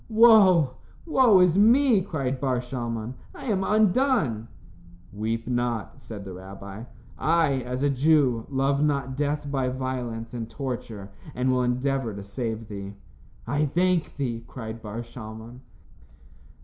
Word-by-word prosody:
"Woe, 200 - +6 0.3
woe 255 - +5
is 180 +1 +4
me," 235 0 +5
cried 135 -8 -3
Bar 130 -3 +1
Shalmon, 120 -2 -4 0.2
"I - - -9
am 200 -6 0
undone." 210 - +2 0.7
"Weep 115 +2 -3
not," 120 -3 -2
said 105 -3 -8
the 95 - -7
rabbi. 95 +3 -9 0.3
"I, 155 -5 +2
as 125 +2 -4
a 145 - +3
Jew, 135 -4 +2
love 140 +1 +1
not 140 -3 0
death 145 0 -2
by 135 -2 0
violence 125 -3 -4
and 115 -2 -5
torture, 115 -7 -6 0.2
and 125 +1 +1
will 125 0 +2
endeavor 125 -2 -1
to 100 - -7
save 110 +1 -4
thee." 100 -1 -7 0.5
"I 145 +1 0
thank 175 +3 +1
thee," 120 -5 -3
cried 115 -2 -7
Bar 110 +2 -6
Shalmon. 115 0 -10
130 Hz, 135 wpm, -26 LUFS, 115-150 Hz, 0.7 s, Woe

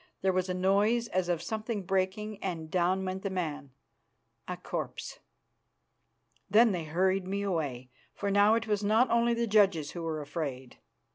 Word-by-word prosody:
There 190 -1 +3
was 185 0 0
a 180 - -1
noise 205 +6 +2
as 185 -1 -1
of 170 -2 0
something 220 -1 -3
breaking, 195 +3 -2
and 165 -4 -4
down 185 +1 +1
went 185 +1 -3
the 195 - -2
man 160 -7 -3 0.8
a - - -4
corpse. - - -5 1.3
Then 220 +3 +6
they 175 -4 -3
hurried 185 +4 +1
me 200 +1 -2
away, 140 -10 -3 0.2
for 200 - -2
now 205 +2 +5
it 230 0 -1
was 210 -2 0
not 220 +5 +3
only 235 0 +3
the 235 0 0
judges 195 -8 +3
who 175 - -6
were 160 -2 -3
afraid. 140 -4 -5
190 Hz, 165 wpm, -30 LUFS, 170-210 Hz, 1.3 s, Then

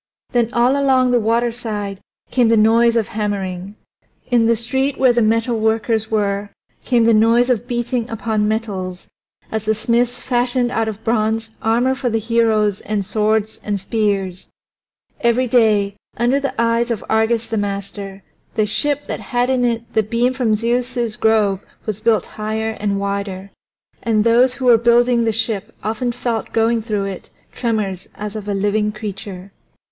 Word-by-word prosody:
Then 240 -2 +2
all 245 +2 +3
along 260 -2 +3
the 245 - +4
waterside 225 -3 -1 0.3
came 245 -2 +3
the 225 0 +4
noise 230 +2 +4
of 225 -3 +1
hammering; 200 -3 -3 0.6
in 235 -2 +4
the 230 - +4
street 265 +4 -1
where 255 -2 +4
the 240 - +2
metalworkers 220 0 +1
were 205 -1 -1 0.3
came 240 -2 +2
the 230 - +5
noise 230 +3 +4
of 245 0 -1
beating 240 -1 -2
upon 215 -1 -1
metals 195 -5 -3 0.5
as 220 -1 -3
the 220 0 +2
smiths 235 +2 0
fashioned 245 0 0
out 225 -2 0
of 220 0 -6
bronze 220 0 0
armor 240 +4 +2
for 260 -1 -2
the 225 - 0
heroes 220 -2 +1
and 205 -2 -2
swords 215 +1 0
and 205 -1 -2
spears. 195 -3 -1 0.7
Every 235 +2 +2
day, 215 -4 +2 0.2
under 245 +4 +2
the 275 -3 -4
eyes 230 +1 +2
of 230 -3 -3
Argus 220 +1 +1
the 225 - -2
master, 200 -1 -5 0.3
the 215 - +2
ship 290 +7 0
that - - -4
had 245 +1 0
in 255 -1 +1
it 235 -1 -1
the 220 - +3
beam 235 +4 0
from 245 -4 +1
Zeus's 240 0 -1
grove 215 -3 +2 0.3
was 215 -1 -4
built 225 -1 +2
higher 220 +1 -3
and 200 -1 -1
wider. 200 -1 -4 0.5
And 220 -2 +2
those 245 +3 +4
who 260 - -4
were 235 -2 +6
building 235 0 +3
the 225 - +2
ship 220 -2 -3
often 225 +4 -1
felt 235 -2 -3
going 225 0 +2
through 210 -3 -2
it 195 -2 -7 0.2
tremors 210 -6 -2
as 210 +1 -6
of 210 -1 -6
a 205 - -1
living 210 +2 +1
creature. 200 -3 -7
225 Hz, 165 wpm, -19 LUFS, 210-240 Hz, 0.7 s, were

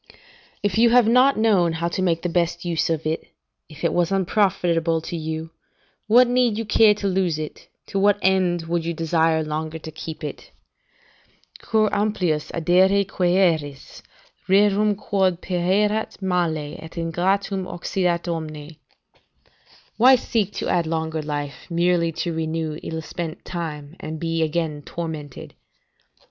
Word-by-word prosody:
] - - -30
"If 205 +1 +1
you 235 +1 +6
have 240 -1 +5
not 255 +4 +5
known 195 -7 +3
how 165 +1 -2
to 185 - -3
make 170 -3 0
the - - 0 0.2
best 170 +1 -7
use 165 -3 0
of 160 -1 -1
it, 160 +1 -2 0.4
if 155 0 -12
it 170 - +1
was 175 +1 +1
unprofitable 175 -4 +1
to 170 - -6
you, 160 0 -4 0.6
what 240 +3 +6
need 245 -3 +2
you 225 - -3
care 210 0 +5
to 205 -1 -3
lose 185 -4 0
it, 155 -1 -7 0.2
to 195 - -3
what 205 +1 +4
end 185 -3 +2
would 170 0 -1
you 170 0 -3
desire 160 0 +1
longer 155 +1 -4
to 160 0 -9
keep 160 +1 -8
it? 150 - -7 1.1
"'Cur 215 -1 +1
amplius 185 -8 0
addere 185 +4 +3
quaeris, 175 -7 0 0.5
Rursum 205 +1 +4
quod 190 -4 0
pereat 195 +5 0
male, 170 -6 -1
et 160 +1 -11
ingratum 185 +3 -1
occidat 175 -1 -1
omne?' 155 -2 -5 1.2
["Why 255 +3 +7
seek 220 -5 -1
to - - -4
add 170 -2 +1
longer 160 -1 -2
life, 145 -1 -5
merely 170 0 +1
to 170 +1 -3
renew 160 -1 -3
ill 160 0 -5
spent 165 0 -6
time, 155 -3 -6
and 155 0 -6
be 165 0 -1
again 155 -2 -1
tormented?" 155 -4 -7
170 Hz, 150 wpm, -22 LUFS, 160-195 Hz, 1.2 s, Why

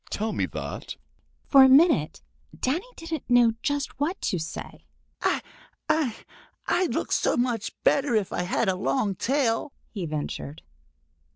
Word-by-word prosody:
Tell 215 +1 -2
me - - 0
that." - - -6 0.5
For 275 -2 +7
a 265 - +7
minute 265 - +4 0.4
Danny 320 - -1
didn't 330 -5 -6
know 245 -2 +6
just 285 -3 -2
what 330 +7 -1
to 180 - -1
say. 160 +1 -7 0.4
"I—I—I'd 320 - -3
look - - -2
so - - +2
much 240 -3 0
better 275 -4 +3
if 210 -3 0
I - - -1
had 185 +5 0
a 190 - +2
long 205 +2 0
tail," 260 +4 0 0.2
he 190 -6 -4
ventured. 150 0 -5
250 Hz, 135 wpm, -26 LUFS, 200-290 Hz, 0.5 s, For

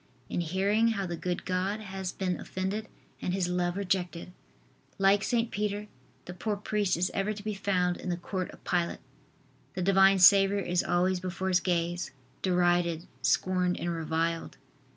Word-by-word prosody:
In - - 0
hearing 195 +6 +2
how 200 -3 -2
the 175 -1 -3
good 180 +1 -3
God 185 +3 -1
has 190 -3 -5
been 185 -2 -2
offended 195 +4 -3 0.3
and 180 - -1
His 185 -2 0
love 180 0 -1
rejected! 180 -3 -2 0.7
Like 195 +1 +4
St. 235 0 0
Peter 210 0 -2 0.4
the 180 - -7
poor 205 +4 -2
priest 205 -3 0
is 180 +2 0
ever 200 +2 0
to 205 -1 -9
be 215 0 -2
found 185 -3 0
in - - -6
the 175 - -1
court 185 +1 -4
of - - -14
Pilate. 175 -1 0 0.8
The 185 - -1
Divine 195 +1 +5
Saviour 195 +1 +7
is 180 -2 0
always 180 +1 +1
before 185 +1 -3
his 180 -1 +4
gaze, 175 -1 -1 0.3
derided, 175 -2 +2 0.2
scorned 180 -1 +1
and 175 0 -2
reviled. 165 +1 -2
185 Hz, 165 wpm, -29 LUFS, 175-195 Hz, 0.8 s, Saviour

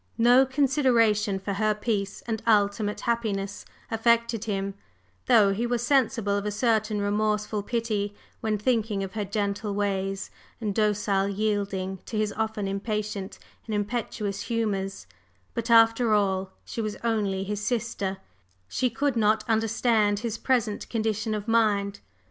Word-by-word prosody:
No 245 +3 +6
consideration 245 -7 +2
for 195 +1 -4
her 215 +1 +1
peace 210 -2 -2
and 225 -2 -2
ultimate 205 -1 +2
happiness 205 -4 -2 0.3
affected 230 0 +2
him, 195 -2 -2 0.5
though 210 -5 +5
he 230 +4 -1
was 240 0 -1
sensible 235 -6 +2
of 200 0 -2
a - - +1
certain 215 -1 +1
remorseful 210 +1 0
pity 210 -2 -2 0.2
when 215 -1 0
thinking 215 -2 0
of 190 - -6
her 215 -2 -2
gentle 200 0 -2
ways 195 -1 -2 0.3
and 215 -3 -2
docile 210 -2 +1
yielding 200 -2 -1
to 220 - -4
his 215 -1 0
often 220 -2 -2
impatient 205 0 -3 0.3
and 215 - -2
impetuous 205 -1 -2
humors; 200 - -2 0.5
but, 230 +1 -3
after 230 0 +5
all, 190 -2 +1 0.2
she 230 - -4
was 215 -1 -3
only 205 -4 0
his 205 +1 -4
sister, 215 -5 -2 0.5
she 250 - 0
could 270 +3 0
not 215 -1 +3
understand 220 -1 +2
his 230 -2 -2
present 230 -3 0
condition 215 -1 -1
of 210 +1 -5
mind. 205 -3 +2
215 Hz, 140 wpm, -26 LUFS, 200-230 Hz, 0.5 s, No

